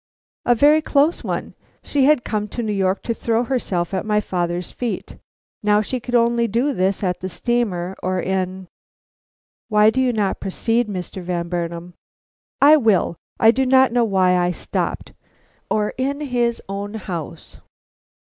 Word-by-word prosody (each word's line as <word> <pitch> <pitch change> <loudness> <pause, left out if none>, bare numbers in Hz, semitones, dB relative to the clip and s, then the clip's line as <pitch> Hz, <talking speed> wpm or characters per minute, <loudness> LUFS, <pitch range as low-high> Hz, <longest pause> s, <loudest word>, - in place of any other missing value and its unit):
"A 240 - +5
very 295 +5 +5
close 300 +1 +2
one. - - -4 0.3
She 280 -2 +1
had 295 -4 +4
come 210 -1 -2
to 235 - -5
New 215 -1 -1
York 190 -1 0
to 230 - -1
throw 230 +1 0
herself 200 -9 -2
at 190 - -1
my 210 0 +1
father's 175 -3 -3
feet. 245 -2 -5 0.4
Now 210 0 +3
she 255 +4 -3
could 245 +1 -3
only 235 0 +3
do 240 +7 0
this 190 -1 0
at 180 -2 -1
the 185 - -5
steamer 190 -3 -1
or 185 0 -1
in 185 0 -2 0.5
" - - -
"Why 210 0 +5
do 260 - 0
you 255 -1 +2
not 210 -4 -1
proceed, 225 +4 0
Mr. 190 -1 -6
Van 175 -1 -3
Burnam?" 170 0 -4 0.7
"I 300 +2 +7
will. 215 - +2 0.2
I 225 - +7
do 265 +3 0
not 260 0 +4
know 240 0 +2
why 190 -4 +3
I 175 0 +2
stopped, 180 - -3 0.6
or 210 -1 0
in 280 +2 -1
his 240 -4 -1
own 200 +2 -5
house." 175 -7 -7
210 Hz, 165 wpm, -21 LUFS, 185-245 Hz, 0.7 s, I